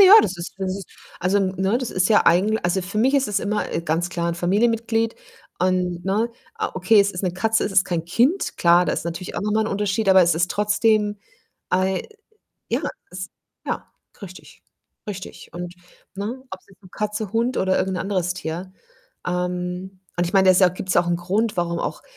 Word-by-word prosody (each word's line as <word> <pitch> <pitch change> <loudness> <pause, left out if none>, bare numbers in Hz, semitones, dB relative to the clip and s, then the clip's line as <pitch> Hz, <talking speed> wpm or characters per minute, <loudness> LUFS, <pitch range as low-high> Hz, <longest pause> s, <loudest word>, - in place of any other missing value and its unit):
Ja, 390 0 +9
das 190 - -2
ist 170 +1 -7
das 190 -1 -2
ist 195 -3 -9 0.3
also, 185 +3 +2
n 190 -1 0
ne, 190 +6 +1
das 255 - -4
ist 185 0 +1
ja 215 - +4
eigentl 200 +6 +4
also, 175 +2 0
für 195 +4 -4
mich 260 +5 +3
ist 275 -5 +2
es 205 - +1
immer 210 +1 -2
e - - 0
ganz 170 +1 -1
klar 170 -1 -2
'n 170 - -1
Familienmitglied 225 +5 +1 0.5
und 180 -1 0
ne 210 +5 +1 0.3
o - - +2
okay, 185 +4 +4
es 200 0 +1
ist 180 - -5
'ne 185 -2 0
Katze, 220 +5 +1
es - - -2
ist 190 0 +4
kein 170 -2 -2
Kind, 245 - +1
klar, 175 +1 +5
da - - 0
ist - - -3
natürlich 170 +2 -5
auch - - -1
noch 210 +1 -1
mal 220 - +2
ein 215 - 0
Unterschied, 205 +1 -1
aber 190 0 +7
es 170 -2 +3
ist 170 +2 0
trotzdem, 210 0 +2 0.5
ei 185 0 +1 0.7
ja, - - 0 0.3
ist 185 +1 -6 0.4
ja, - - -4 0.3
richtig, 185 -3 -12 0.5
richtig, 190 -2 -8
und 175 0 -6 0.4
ne, 215 +7 -5
ob's 190 - -9
jetzt 195 0 -22
'ne 185 - -16
Katze, 210 -1 -3
Hund 235 +3 +1
oder 190 0 +2
irgend 190 -1 -1
'n - - -2
anderes 185 -2 -1
Tier 175 +1 -5 0.6
ähm, 180 +1 -3 0.2
und 175 - +2
ich 170 - -5
meine, 190 -1 +5
da - - +8
ist 185 - +3
ja 185 - +7
auch 180 - -9
gibt's 185 0 -2
auch 175 - +4
ein 175 0 +1
Grund, 200 +6 -1
warum 170 -1 -1
auch - - -4
190 Hz, 215 wpm, -22 LUFS, 180-210 Hz, 0.7 s, Ja